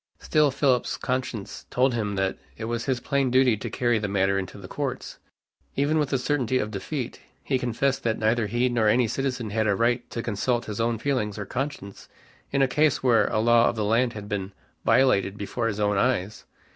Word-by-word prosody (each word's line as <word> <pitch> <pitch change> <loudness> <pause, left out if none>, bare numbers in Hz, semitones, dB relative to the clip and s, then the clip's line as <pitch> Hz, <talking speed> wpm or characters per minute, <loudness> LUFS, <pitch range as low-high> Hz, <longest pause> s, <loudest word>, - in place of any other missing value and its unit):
Still 150 -1 +2
Philip's 135 -2 +1
conscience 125 -5 -4
told 130 +1 +2
him 105 -3 -2
that 95 0 -1 0.2
it 110 - -6
was 115 +1 -3
his 130 -3 0
plain 140 +1 0
duty 130 -2 +4
to 115 +3 -5
carry 120 0 +1
the 105 - -2
matter 95 0 +1
into 95 - -6
the - - -10
courts, - - -5 0.6
even 145 +3 +2
with 150 -3 0
the 135 - +1
certainty 130 -1 0
of 105 -4 -2
defeat. 120 +6 -4 0.2
He 130 -2 0
confessed 125 +3 0
that 110 -1 0
neither 110 0 +1
he 120 +3 +1
nor 120 -3 +1
any 120 +2 +4
citizen 125 -3 -2
had 110 +1 +1
a 100 - +3
right 120 +3 0
to 115 - -4
consult 120 +2 -1
his 105 +1 -4
own 115 0 +1
feelings 110 -5 -1
or 105 - -4
conscience 125 -4 -5 0.4
in 135 0 +3
a - - +4
case 150 +1 +2
where 115 -4 +4
a - - -1
law 120 +1 +4
of - - -3
the 110 -2 -1
land 120 +3 +2
had 105 -1 -7
been 100 -2 -4 0.3
violated 100 -7 +3
before 115 +3 -2
his 105 -2 -3
own 105 -1 +2
eyes. 110 -5 0
120 Hz, 210 wpm, -25 LUFS, 105-130 Hz, 0.6 s, duty